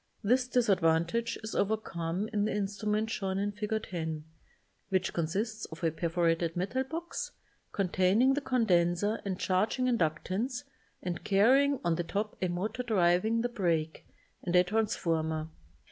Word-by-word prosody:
This 250 +4 +3
disadvantage 200 -1 +2
is 220 - -5
overcome 195 -3 -1
in 205 -1 +2
the - - 0
in 205 -1 0
strument 210 +2 -1
shown 190 -3 -2
in 205 +1 0
Fig. 210 +1 -2
10, 160 -3 -4 0.7
which 190 -2 0
consists 205 +7 -2
of 160 - -11
a 165 - +3
perforated 165 0 0
metal 210 +9 0
box 340 - -5 0.4
containing 195 +6 +3
the 285 - -1
condenser 205 -5 +2
and 190 -2 -3
charging 210 +7 +1
inductance 230 - 0 0.4
and 175 -2 -3
carrying 265 +8 +4
on 170 -1 +2
the 175 - 0
top 205 +5 -3
a 185 - +2
motor 185 +8 -2
driving 215 0 +2
the 245 - 0
break, 170 -8 -1 0.3
and 175 0 -1
a 180 - +7
transformer. 165 -6 -1
195 Hz, 145 wpm, -30 LUFS, 175-225 Hz, 0.7 s, a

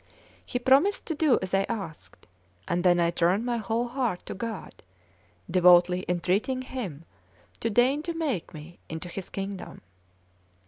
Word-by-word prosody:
He - - -2
promised 275 +11 +3
to 325 - -2
do 305 -4 +3
as 190 - -5
I 195 - +4
asked; 165 - -7 0.4
and 175 +1 0
then 175 -1 +4
I 170 0 +3
turned 175 +6 +1
my 240 -1 0
whole 225 +2 -1
heart 240 -7 -2
to - - -5
God, 225 -1 -6 0.7
devoutly 180 +1 +5
entreating 195 +9 0
Him 195 - -6 0.5
to 230 - -1
deign 250 +6 +3
to 335 +2 -4
take 285 - -2
me 160 +3 -11
into 160 +2 -6
His 190 +1 -6
kingdom. 195 0 -6
195 Hz, 150 wpm, -27 LUFS, 175-250 Hz, 0.7 s, devoutly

